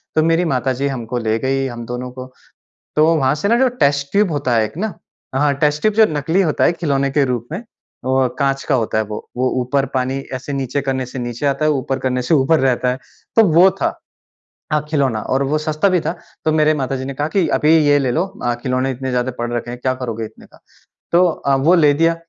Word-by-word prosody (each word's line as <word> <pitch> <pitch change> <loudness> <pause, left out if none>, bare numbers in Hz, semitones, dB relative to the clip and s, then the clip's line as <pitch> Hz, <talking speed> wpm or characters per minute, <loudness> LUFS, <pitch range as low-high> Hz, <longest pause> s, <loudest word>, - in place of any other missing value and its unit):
तो 155 - +4
मेरी 165 +2 +2
माता 130 +1 0
जी 140 +3 -1
हमको 125 -2 -4
ले 110 -1 0
गई 135 0 0
हम 120 -2 -7
दोनों 125 +1 -5
को। 130 0 -9 0.6
तो 155 +1 +5
वहाँ 135 -2 +2
से 155 - -2
ना 235 +3 +3
जो 265 - +4 0.2
टेस्ट 140 0 +1
ट्यूब 200 -3 +2
होता 140 -5 0
है 110 - +3
एक 110 - -9
ना, 215 -1 -2 0.4
हाँ, 145 +1 +2
टेस्ट 150 0 +1
ट्यूब 215 -1 +2
जो 220 0 +6
नकली 160 +6 +1
होता 160 -5 +1
है - - +5
खिलौने 140 -5 0
के 145 0 +2
रूप 120 -2 -3
में, 185 +8 -4 0.4
वो 130 0 +2
काँच 135 0 0
का 140 - +1
होता 115 -3 -1
है 110 - +2
वो। 105 0 -6 0.2
वो 130 0 +1
ऊपर 135 +2 0
पानी 130 +1 -1
ऐसे 135 +2 -5
नीचे 135 +1 -2
करने 130 -1 -2
से 125 +1 -7
नीचे 120 +3 -4
आता 140 +2 +1
है, 155 - +4
ऊपर 135 -1 -2
करने 125 -1 -1
से 125 - 0
ऊपर 145 +4 +3
रहता 130 -1 +1
है, 125 - -1 0.4
तो 225 - +7
वो 180 +3 +7
था - - -1 0.7
अ, 150 - +4
खिलौना 135 -7 0
और 135 - +2
वो 155 - +2
सस्ता 155 +4 0
भी 185 -2 +2
था। 160 +2 -2 0.3
तो 155 - +2
मेरे 155 0 +3
माता 135 0 -2
जी 130 - -5
ने 140 - -5
कहा 145 +3 -1
कि, 180 0 +1
"अभी 150 - +2 0.2
ये 145 0 +5
ले 130 -3 0
लो 170 +4 +1 0.2
अ, 120 0 +1
खिलौने 130 +1 0
इतने 130 +1 -4
ज़्यादा 125 +1 0
पड़ 120 0 -2
रखे 120 0 -3
हैं, 120 - -6
क्या 130 0 0
करोगे 115 -3 -3
इतने - - -12
का?" - - -21 0.5
तो 175 +2 +5
अ, 140 -4 0
वो 150 +7 +3
ले 150 -4 +5
दिया। 165 +2 +2
135 Hz, 245 wpm, -18 LUFS, 125-155 Hz, 0.7 s, तो